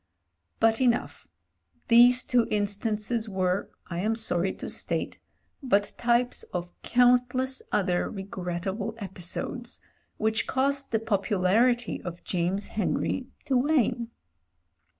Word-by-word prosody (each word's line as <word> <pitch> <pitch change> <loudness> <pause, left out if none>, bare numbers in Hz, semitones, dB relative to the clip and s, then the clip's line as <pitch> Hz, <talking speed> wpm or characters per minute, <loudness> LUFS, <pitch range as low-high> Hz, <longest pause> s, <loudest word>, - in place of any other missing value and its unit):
But 225 +2 +3
enough: 245 -2 0 0.6
these 245 +2 +7
two 240 -2 +2
instances 215 +2 -1
were, 185 0 0 0.2
I 170 -1 -5
am 215 +4 +1
sorry 190 -4 +1
to - - -7
state, - - -2 0.4
but 205 -7 +1
types 240 +1 +1
of 175 0 -3
cotmtless 250 +1 +2
other 185 -3 +1
regrettable 190 +2 -4
epi 190 -4 -8
sodes 240 +8 -3 0.4
which 220 0 0
caused 275 +1 0
the 225 - +2
popularity 220 +3 +1
of 175 -1 -7
James 185 +3 -1
Henry 235 +5 -1 0.2
to 275 -3 0
wane. 250 -4 +2
220 Hz, 110 wpm, -27 LUFS, 195-245 Hz, 0.6 s, these